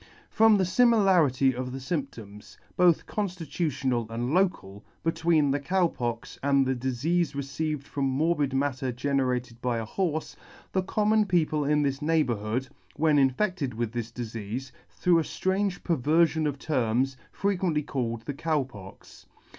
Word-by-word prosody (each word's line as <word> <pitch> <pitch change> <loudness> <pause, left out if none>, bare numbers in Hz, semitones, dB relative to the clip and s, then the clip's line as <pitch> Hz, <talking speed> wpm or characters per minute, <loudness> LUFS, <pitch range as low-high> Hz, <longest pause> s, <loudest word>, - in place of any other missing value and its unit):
From 220 -1 +5
the 190 - +2
fimilarity 185 - +4
of 125 +1 -4
lymptoms, 130 - -6 0.2
both 175 -3 +4
conftitutional 150 - -2
and 120 +4 -2
local, 105 - 0 0.2
between 160 -3 +2
the 145 - 0
Cow 180 +6 +1
Pox 120 -4 -5
and 140 -1 +3
the 130 - +1
difeafe 135 +5 -1
received 140 +1 -3
from 140 -2 -2
morbid 145 +1 +1
matter 135 -1 -1
generated 125 -2 -1
by 125 -2 0
a 115 - -3
horfe, 160 - -2 0.4
the 190 - +1
common 210 +2 +2
people 155 -5 +1
in 150 +1 +2
this 140 0 -1
neighbourhood, 130 -6 0 0.3
when 155 0 +3
infedted 140 - 0
with 115 -1 -2
this 120 -1 -4
difeafe, 115 +1 -6 0.2
through 175 -2 +2
a - - +2
Itrange 190 +3 -1
perverfion 160 +1 +2
of 145 -1 -3
terms, 130 -2 0 0.2
frequently 180 -6 0
called 115 -5 -3
the 140 - -4
Cow 155 0 0
Pox. 100 -7 -13
140 Hz, 140 wpm, -27 LUFS, 125-165 Hz, 0.4 s, From